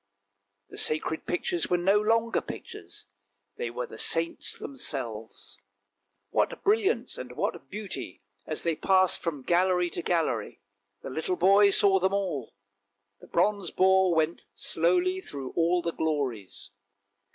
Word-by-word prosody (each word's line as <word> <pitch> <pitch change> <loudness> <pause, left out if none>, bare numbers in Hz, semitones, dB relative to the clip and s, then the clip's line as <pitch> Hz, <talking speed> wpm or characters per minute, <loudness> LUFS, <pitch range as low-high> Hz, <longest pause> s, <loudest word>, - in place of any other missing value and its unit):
The - - -4
sacred 155 +1 0
pictures 175 -1 -1
were 180 - +3
no 195 +4 +3
longer 230 +1 +2
pictures, 85 +1 -9 0.5
they 120 - -3
were 120 +1 -4
the 110 - -10
saints 165 0 0
themselves. 115 -5 -5 0.7
What - - 0
brilliance 420 +1 +1
and - - -7
what - - -3
beauty 205 - -6 0.2
as 155 - -4
they 165 -2 +1
passed 185 +2 +3
from 150 -6 -3
gallery 180 +2 +2
to - - -3
gallery! 160 - -1 0.4
the - - -6
little 160 +6 -1
boy 200 +3 +6
saw 195 -1 +4
them 190 +2 +1
all; 175 - -3 0.6
the - - -15
bronze 195 0 +1
boar 190 -1 +4
went 160 +1 0
slowly 370 +1 +2
through 140 - -6
all 170 +1 +2
the 170 -1 -1
glories. 135 -13 -3
175 Hz, 135 wpm, -28 LUFS, 150-195 Hz, 0.7 s, boy